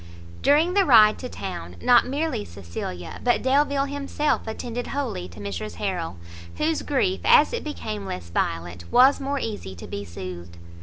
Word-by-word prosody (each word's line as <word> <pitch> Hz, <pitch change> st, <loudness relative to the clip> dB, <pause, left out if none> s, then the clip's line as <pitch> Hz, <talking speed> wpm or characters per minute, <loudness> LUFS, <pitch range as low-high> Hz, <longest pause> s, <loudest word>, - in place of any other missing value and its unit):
During 315 Hz, +5 st, +4 dB
the 400 Hz, 0 st, +4 dB
ride 215 Hz, -, +6 dB
to 250 Hz, -, -6 dB
town, 185 Hz, -6 st, -6 dB
not 245 Hz, -1 st, +5 dB
merely 290 Hz, -, -1 dB
Cecilia, 85 Hz, -1 st, -7 dB
but 245 Hz, -, +2 dB
Delvile 280 Hz, +1 st, +2 dB
himself 285 Hz, 0 st, -1 dB
attended 240 Hz, +2 st, -4 dB
wholly 260 Hz, -, -3 dB
to 85 Hz, +3 st, -13 dB
Mrs 100 Hz, -1 st, -5 dB
Harrel, 85 Hz, 0 st, -3 dB, 0.4 s
whose 315 Hz, 0 st, 0 dB
grief 225 Hz, -10 st, 0 dB
as 300 Hz, -, +6 dB
it 475 Hz, -, -2 dB
became 105 Hz, -, -5 dB
less 85 Hz, -2 st, -6 dB
violent, 85 Hz, +1 st, -3 dB
was 260 Hz, +3 st, +6 dB
more 280 Hz, +1 st, -2 dB
easy 205 Hz, -, -5 dB
to 85 Hz, -, -9 dB
be 100 Hz, -, -5 dB
soothed. 85 Hz, -1 st, -8 dB
220 Hz, 160 wpm, -24 LUFS, -, 0.4 s, ride